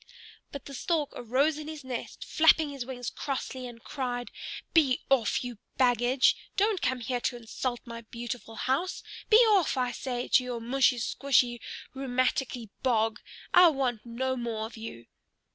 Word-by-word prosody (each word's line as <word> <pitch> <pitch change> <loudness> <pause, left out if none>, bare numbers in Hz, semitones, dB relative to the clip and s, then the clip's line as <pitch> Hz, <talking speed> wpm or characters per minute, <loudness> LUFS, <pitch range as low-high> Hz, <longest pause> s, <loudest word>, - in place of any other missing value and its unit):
But 280 - -8
the 280 - -9
Stork 300 +2 -1
arose 275 +6 +1
in 305 - -7
his 310 -2 -7
nest, 255 -2 -6
flapping 315 -1 +4
his 270 -3 -6
wings 245 -2 -5
crossly, 260 -2 -4
and 230 -1 -12
cried, 245 -3 -4 0.4
"Be 280 -6 +4
off, 250 -4 +3
you 245 -4 -6 0.2
baggage! 250 +1 +4 0.2
Don't 410 -1 +2
come 255 -1 0
here 245 +1 -2
to 245 - -1
insult 240 +1 -4
my 230 -1 -7
beautiful 235 0 -7
house. 275 +11 -1 0.3
Be 430 - +8
off, 375 -9 +3
I 250 -1 +1
say, 245 -1 -3
to 255 - +4
your 245 -2 -4
mushy 250 +2 +2
squshy, 245 0 +2 0.4
rheumaticky 255 -2 -1
bog. 225 -3 +1 0.3
I 360 0 +9
want 265 -7 0
no 260 +2 -2
more 230 -3 -3
of 225 - -9
you!" 220 - -8
250 Hz, 160 wpm, -29 LUFS, 240-275 Hz, 0.4 s, I